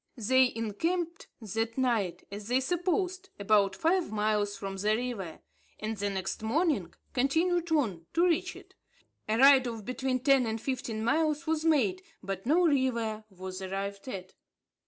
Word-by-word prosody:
They 255 Hz, +3 st, +4 dB
encamped 325 Hz, -, -2 dB
that 225 Hz, +2 st, -3 dB
night, 225 Hz, -9 st, 0 dB
as 205 Hz, +1 st, -7 dB
they 250 Hz, +2 st, +3 dB
supposed, 365 Hz, +5 st, -1 dB
about 200 Hz, -1 st, +3 dB
five 345 Hz, -, +1 dB
miles 210 Hz, -1 st, 0 dB
from 195 Hz, -1 st, -5 dB
the 210 Hz, +3 st, +2 dB
river, 220 Hz, -9 st, -4 dB, 0.4 s
and 215 Hz, +1 st, -3 dB
the 205 Hz, 0 st, -2 dB
next 190 Hz, 0 st, -3 dB
morning 225 Hz, -, 0 dB, 0.2 s
continued 330 Hz, +6 st, +1 dB
on, 205 Hz, -, 0 dB
to 340 Hz, +2 st, +4 dB
reach 355 Hz, +1 st, +1 dB
it. -, -, -14 dB, 0.6 s
A 220 Hz, -, +2 dB
ride 270 Hz, 0 st, +7 dB
of 225 Hz, -3 st, -6 dB
between 255 Hz, 0 st, -1 dB
ten 270 Hz, -2 st, +4 dB
and 220 Hz, 0 st, -2 dB
fifteen 240 Hz, -3 st, -3 dB
miles 310 Hz, +5 st, +1 dB
was 315 Hz, -1 st, 0 dB
made, 245 Hz, -, +2 dB, 0.2 s
but 195 Hz, +2 st, -5 dB
no 345 Hz, +5 st, +4 dB
river 235 Hz, -7 st, +1 dB
was 185 Hz, -1 st, -7 dB
arrived 195 Hz, +3 st, -4 dB
at. 185 Hz, -7 st, -6 dB
235 Hz, 155 wpm, -30 LUFS, 205-305 Hz, 0.6 s, ride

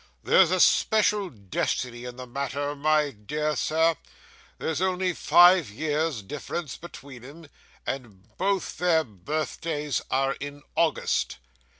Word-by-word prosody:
'There's -, -, +5 dB
a -, -, +1 dB
special 210 Hz, -2 st, +3 dB
destiny 120 Hz, -, -3 dB
in 125 Hz, -1 st, -7 dB
the 130 Hz, 0 st, -8 dB
matter, 140 Hz, +3 st, -3 dB
my 150 Hz, 0 st, +2 dB
dear 150 Hz, +9 st, -3 dB
sir; 160 Hz, +1 st, +2 dB, 0.6 s
there's 160 Hz, +1 st, -2 dB
only 185 Hz, -1 st, +1 dB
five 175 Hz, -, +6 dB
years' 150 Hz, +1 st, -2 dB
difference 150 Hz, -, -5 dB
between 140 Hz, -7 st, -11 dB
'em, 155 Hz, +6 st, -12 dB, 0.4 s
and 110 Hz, -5 st, -7 dB
both 195 Hz, 0 st, -1 dB
their 170 Hz, -3 st, +3 dB
birthdays 150 Hz, -, -3 dB
are 135 Hz, +1 st, +1 dB
in 145 Hz, 0 st, -7 dB
August. 165 Hz, -1 st, +1 dB
150 Hz, 120 wpm, -26 LUFS, 130-165 Hz, 0.6 s, five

